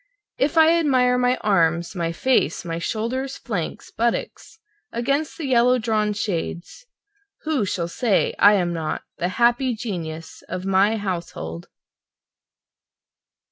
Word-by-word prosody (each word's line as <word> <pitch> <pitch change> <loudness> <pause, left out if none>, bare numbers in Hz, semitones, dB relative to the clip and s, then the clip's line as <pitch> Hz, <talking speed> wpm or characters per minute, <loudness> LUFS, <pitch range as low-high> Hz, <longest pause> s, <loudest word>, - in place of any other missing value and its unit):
If 290 +4 +1
I 325 +1 +6
admire 250 -5 +3
my 250 0 +2
arms, 170 -4 +1
my 170 -2 -1
face, 260 +1 +1
my 165 -1 -3
shoulders, 250 +9 -3
flanks, 200 -9 -5
buttocks 235 +7 -2 0.3
against 275 +6 -1
the 320 - -4
yellow 250 -1 +4
drawn 215 -3 0
shades, 200 - -4 0.6
Who 305 -8 0
shall 175 -3 -2
say 205 +3 +1
I 205 +1 +7
am 175 -3 0
not 160 -2 -3 0.2
the 175 - 0
happy 240 +1 +3
genius 165 -8 -6
of 185 +1 -4
my 195 +3 +3
household? 170 - -5
215 Hz, 125 wpm, -22 LUFS, 175-250 Hz, 0.6 s, I